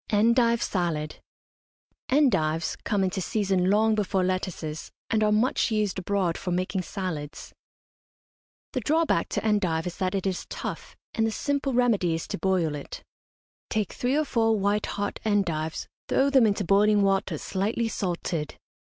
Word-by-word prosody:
ENDIVE 235 +2 +3
SALAD. 160 -5 -2 0.9
Endives 190 - +2
come 200 -2 +1
into 190 0 -1
season 190 -2 +1
long 220 +2 +4
before 195 -3 0
lettuces, 180 -4 -3 0.2
and 220 -1 +2
are 210 - +3
much 220 +5 +2
used 210 -4 0
abroad 185 -2 -1
for - - -4
making 185 +1 -1
salads. 170 -6 -5 1.2
The 255 - 0
drawback 315 +7 +1
to - - -2
endive 185 -7 +1
is 180 - -5
that 185 0 -1
it 195 - -2
is 190 -2 -2
tough, - - -6 0.2
and 225 0 +1
the - - -1
simple 280 +2 -1
remedy 215 -9 +2
is 165 - -5
to - - -4
boil 180 -4 +1
it. 145 -1 -7 0.7
Take 215 -3 -1
three 250 +3 0
or 310 - +1
four 225 -4 +2
white 205 +1 0
heart 205 0 -3
endives, 170 -7 0 0.2
throw 275 +1 +3
them 260 -5 +6
into 200 0 0
boiling 205 +2 +4
water 195 0 +1
slightly 215 +4 -1
salted. 175 -6 -3
200 Hz, 155 wpm, -26 LUFS, 180-220 Hz, 1.2 s, them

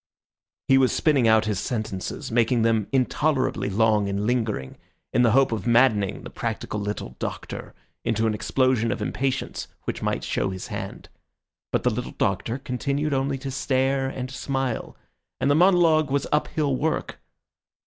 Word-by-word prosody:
He 135 0 +6
was 130 -1 +4
spinning 140 -7 +3
out 110 0 +5
his 105 -4 -1
sentences, 110 -6 -4
making 115 0 +2
them 110 -3 +2
intolerably 135 -1 +1
long 105 0 +2
and 100 +1 -1
lingering, 110 - -1 0.3
in - - +4
the 115 -3 +4
hope 135 0 +4
of 110 -3 -3
maddening 115 -5 +3
the - - -8
practical 115 -2 -3
little 100 -11 -4
Doctor - - -6 0.3
into 110 0 0
an 110 - +2
explosion 115 +2 +1
of - - -2
impatience 135 0 -2 0.2
which - - -4
might - - -1
show 100 - -1
his 95 -1 -6
hand. - - -6 0.6
But - - 0
the - - +3
little - - -4
Doctor 115 - 0
continued 140 +2 -2
only 135 0 0
to 135 0 -5
stare 135 0 +1
and 130 -1 -5
smile, 135 -3 -3 0.4
and 140 - +2
the - - +4
monologue 165 -3 +4
was 140 0 0
uphill 150 -2 +1
work. 155 +4 -2
125 Hz, 160 wpm, -25 LUFS, 110-135 Hz, 0.6 s, He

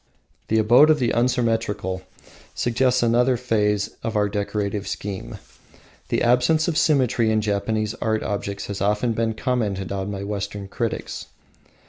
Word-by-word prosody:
The 110 - +1
"Abode 120 +8 +6
of 155 - +5
the 125 -4 +1
Unsymmetrical" 115 -6 0 0.5
suggests 125 +1 +1
another 120 +2 +3
phase 105 -4 0
of 115 -1 -3
our 105 -1 +2
decorative 100 0 -2
scheme. 100 -1 -5 0.7
The - - +1
absence 125 +6 +3
of 170 - 0
symmetry 130 -7 +2
in 110 - +2
Japanese 110 +1 -1
art 110 -1 0
objects 100 -1 -3
has 100 -1 -5
been 100 - +1
often 110 +1 0
commented 105 -7 -1
on 95 0 -3
by 100 -1 -4
Western 100 -1 -4
critics. 115 +2 -4
110 Hz, 140 wpm, -23 LUFS, 100-120 Hz, 0.7 s, Abode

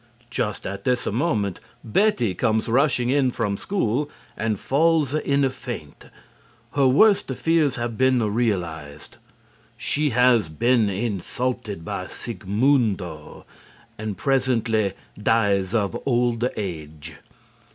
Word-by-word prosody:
Just 105 -3 -2
at 100 +1 -5
this 125 -1 0
moment 105 - 0 0.2
Betty 120 - +2
comes 110 +5 0
rushing 125 0 +2
in 135 -2 +3
from 115 -5 -1
school 145 - -1 0.3
and 110 -1 -1
falls 155 0 +2
in 140 -2 +1
a - - +2
faint. 120 - -8 0.7
Her 140 -2 +3
worst 200 +11 +5
fears 155 +2 +1
have 120 -2 -4
been 125 -5 +2
realized. 85 -10 -3 0.6
She 150 0 0
has 125 - +3
been 115 +6 +2
insulted 105 -1 -3
by - - -4
Sigmundo, 105 - -1 0.5
and 110 -3 -4
presently 115 -6 +1 0.3
dies 100 -2 +2
of 105 -1 0
old 120 -1 +1
age. 80 -5 -6
115 Hz, 110 wpm, -23 LUFS, 100-130 Hz, 0.7 s, worst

